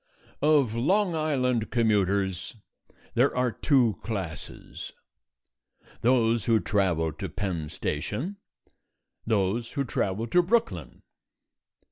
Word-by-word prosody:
Of 145 -6 +4
Long 180 - +2
Island 130 -7 0
commuters 100 -4 +1 0.6
there 125 +2 +2
are 125 -1 +2
two 120 - +2
classes: 95 -9 -6 1.1
those 115 -2 +3
who 115 -1 +4
travel 85 -4 0
to 90 +4 -6
Penn 85 -3 -3
Station, 110 - -3 0.9
those 110 +2 0
who 140 - 0
travel 110 -3 -1
to 175 +10 +4
Brooklyn. 230 +6 -1
115 Hz, 95 wpm, -27 LUFS, 95-135 Hz, 1.1 s, Of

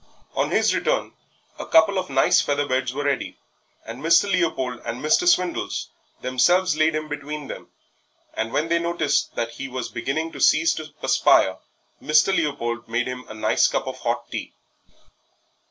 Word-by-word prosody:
On - - 0
his - - +2
return - - -1 0.5
a - - -5
couple 205 -3 +4
of 185 - -5
nice 135 0 +4
feather 145 0 0
beds 130 -2 -1
were 145 +3 -4
ready, 140 -2 -2 0.5
and 115 +4 -8
Mr. 165 +4 +5
Leopold 145 -9 -1
and 115 +1 -5
Mr. 155 - +2
Swindles 180 - +1 0.3
themselves 175 +8 +2
laid 155 +1 +2
him 155 0 -3
between 145 0 -6
them, - - -8 0.7
and 110 +1 -3
when 155 +6 0
they 170 0 +1
noticed 170 -3 -1
that 115 0 -2
he 135 +4 -7
was 130 -2 -5
beginning 150 +7 -3
to - - -9
cease 160 +2 +4
to 155 0 -7
perspire - - +3 0.4
Mr. 155 +5 +3
Leopold 120 -8 -2
made 120 +2 0
him 125 -1 -6
a 110 - -9
nice 110 - +2
cup - - -2
of - - -6
hot - - -3
tea. - - -5
145 Hz, 170 wpm, -23 LUFS, 125-165 Hz, 0.7 s, Mr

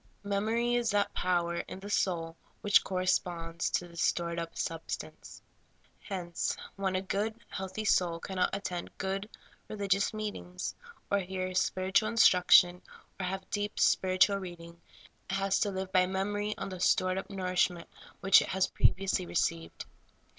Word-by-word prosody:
Memory 220 +4 0
is 240 -1 +1
that 205 -1 +1
power 175 -1 0
in - - -8
the 200 +1 -8
soul 165 -5 0 0.3
which 205 - +5
corresponds 175 -2 -1
to 175 - -1
this 170 0 -6
stored 170 -1 0
up 165 0 -6
substance. 165 0 -5 0.6
Hence, 180 -4 -3 0.2
when 195 -1 -1
a 185 - -1
good, 215 +4 -2
healthy 190 +3 -5
soul 175 -4 +2
cannot 185 +1 -1
attend 180 -3 -5
good, 195 +2 -3 0.4
religious 200 -1 0
meetings, 205 -4 -5 0.4
or 200 - +3
hear 185 0 -4
spiritual 190 +3 +1
instruction, 180 -5 +6 0.4
or 185 - -2
have 190 0 -4
deep, 205 0 -2
spiritual 185 +2 +4
reading, 170 -3 -9 0.5
it 190 - -1
has 195 0 +1
to 205 - +1
live 190 -1 -4
by 185 -1 +4
memory 205 +2 -2
on - - -4
the 185 -1 -7
stored 185 +1 +2
up - - -8
nourishment 180 -3 0 0.3
which 195 0 +7
it - - -3
has 190 0 +1
previously 190 -1 +1
received. 165 -1 -2
190 Hz, 145 wpm, -31 LUFS, 180-200 Hz, 0.6 s, which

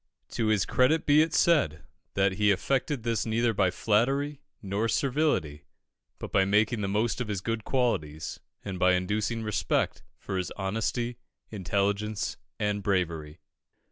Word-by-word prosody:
To 115 - -1
his 105 -4 +2
credit 130 - +2
be 150 +1 +6
it 160 +1 +1
said, 95 - +2 0.3
that 95 0 +3
he 105 +2 +2
effected 130 - 0
this 115 -3 0
neither 115 +1 +1
by 95 -3 +2
flattery 135 +10 0 0.2
nor 100 +3 -1
servility, 125 - 0 0.5
but - - -7
by 95 - +4
making 105 +3 +2
the 100 - -1
most 110 +5 0
of 125 - -3
his 105 -3 -2
good 115 +3 -3
qualities, 80 - -1 0.3
and 95 -2 -4
by 90 0 +4
inducing 105 +5 -1
respect 105 -2 0 0.2
for 95 - -4
his 90 - -2
honesty, 115 +4 -2 0.3
intelligence, 100 +1 -1 0.2
and 105 -1 0
bravery. 85 -6 -1
105 Hz, 145 wpm, -28 LUFS, 95-120 Hz, 0.5 s, be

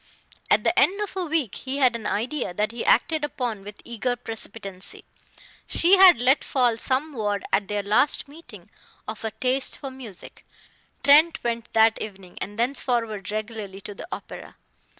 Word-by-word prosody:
At - - +4
the - - +3
end 395 +3 +3
of 415 -2 -4
a 370 -2 -2
week 300 -10 0
he 270 +1 -4
had 255 -4 +3
an 225 -2 -4
idea 235 -4 -2
that 210 +3 0
he 235 0 -5
acted 310 +5 +2
upon 245 -8 -3
with 205 +1 -10
eager 240 +1 -2
precipitancy. 215 -5 -5 0.6
She 365 +4 +5
had 375 -5 +8
let 255 +4 +3
fall 245 -4 +1
some 285 +4 0
word, 205 -4 -2
at 200 - +2
their 205 -1 -2
last 235 +9 +2
meeting, 245 - -14 0.4
of 220 +1 -6
a 220 - -1
taste 255 +5 0
for 275 -2 -7
music. 245 -8 -8 0.6
Trent 310 +4 +5
went 235 -1 -3
that 225 0 +4
evening, 190 -4 -8
and 205 +1 -6
thenceforward 235 -5 -1
regularly, 215 -2 -5
to 205 - -7
the 200 - -9
opera. - - -8
235 Hz, 170 wpm, -24 LUFS, 210-275 Hz, 0.6 s, had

